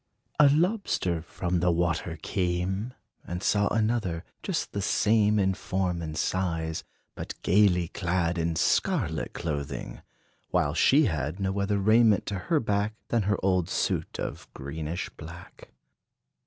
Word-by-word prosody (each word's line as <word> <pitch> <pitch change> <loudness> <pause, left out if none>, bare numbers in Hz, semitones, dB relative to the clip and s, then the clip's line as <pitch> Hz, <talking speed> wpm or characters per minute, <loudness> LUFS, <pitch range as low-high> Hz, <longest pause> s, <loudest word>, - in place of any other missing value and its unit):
A 145 -1 +8
Lobster 155 - +1
from 90 +1 -2
the 90 +1 +2
water 85 -1 0
came, 95 +5 -1 0.3
And 90 +2 -5
saw 100 -1 +3
another, 110 -7 0 0.2
just - - -2
the 100 - -3
same 105 +1 +3
In 95 -1 +2
form 95 -2 -2
and 80 -1 -5
size; 80 -4 -1 0.3
but - - -7
gayly 90 -3 +4
clad 90 -2 -1
In 85 0 0
scarlet - - 0
clothing; 70 -4 -4 0.5
while 70 - +1
she 140 - +5
had 80 - -2
No 95 0 -1
other 100 +1 +1
raiment 110 +1 +4
to 100 -2 -3
her 160 - +4
back 105 -2 0
Than 115 - +2
her 105 - +2
old 90 -3 +2
suit - - -1
of - - -5
greenish 75 +5 -4
black. 85 +2 -11
95 Hz, 140 wpm, -27 LUFS, 85-105 Hz, 0.5 s, A